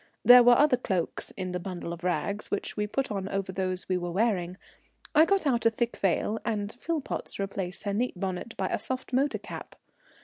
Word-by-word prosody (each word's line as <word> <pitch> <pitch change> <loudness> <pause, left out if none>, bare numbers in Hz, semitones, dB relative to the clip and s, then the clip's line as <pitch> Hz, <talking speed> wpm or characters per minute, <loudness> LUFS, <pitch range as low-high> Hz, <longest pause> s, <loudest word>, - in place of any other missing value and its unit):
There 245 0 +10
were 240 0 +7
other 290 -3 +5
cloaks 190 -8 -2
in 185 -1 -3
the 180 - -2
bundle 175 -2 -5
of 170 0 -10
rugs, 200 +3 -1
which 205 - -3
we 210 0 -1
put 270 +4 -2
on 195 -1 -3
over 195 -1 -2
those 185 -1 -3
we 185 -1 +1
were 175 0 -3
wearing. 185 -2 0 0.6
I 315 +1 +7
got 390 -2 +1
out 240 -5 +3
a - - +7
thick 235 +1 -2
veil, 205 +3 0
and 210 -2 -2
Philpotts 310 +4 -4
replaced 195 -2 -4
her 200 - -2
neat 225 -3 -1
bonnet 190 +4 -4
by - - -1
a - - -1
soft 260 0 -4
motor 275 +3 +2
cap. - - -9
205 Hz, 205 wpm, -28 LUFS, 185-245 Hz, 0.6 s, There